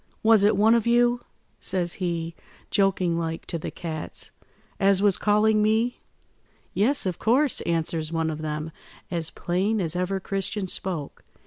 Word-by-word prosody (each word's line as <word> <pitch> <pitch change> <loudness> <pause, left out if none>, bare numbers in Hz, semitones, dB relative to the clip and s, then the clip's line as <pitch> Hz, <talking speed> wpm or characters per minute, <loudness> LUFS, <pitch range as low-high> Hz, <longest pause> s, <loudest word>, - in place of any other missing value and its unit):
'Was 220 -2 +6
it 205 -1 +4
one 220 +3 +5
of 235 -1 +2
you,' 240 0 +3 0.4
says 175 -2 -1
he, 170 -2 -2 0.4
joking 185 -4 +2
like, 165 -1 -4
to 170 - -4
the - - -4
cats, 160 -3 -5 0.5
'as 195 -1 +4
was 200 -2 +4
calling 215 +1 +3
me?' 220 +3 +1 0.7
"'Yes, 255 +6 +2
of 180 -2 -2
course,' 260 +5 +2
answers 165 -1 -1
one 165 -1 0
of 155 0 -6
them, 155 +1 -4 0.4
as 165 -2 -2
plain 195 +5 -1
as 170 -3 -1
ever 180 +2 -1
Christian 195 +1 -3
spoke. 175 -5 -4
190 Hz, 150 wpm, -25 LUFS, 165-215 Hz, 0.7 s, Was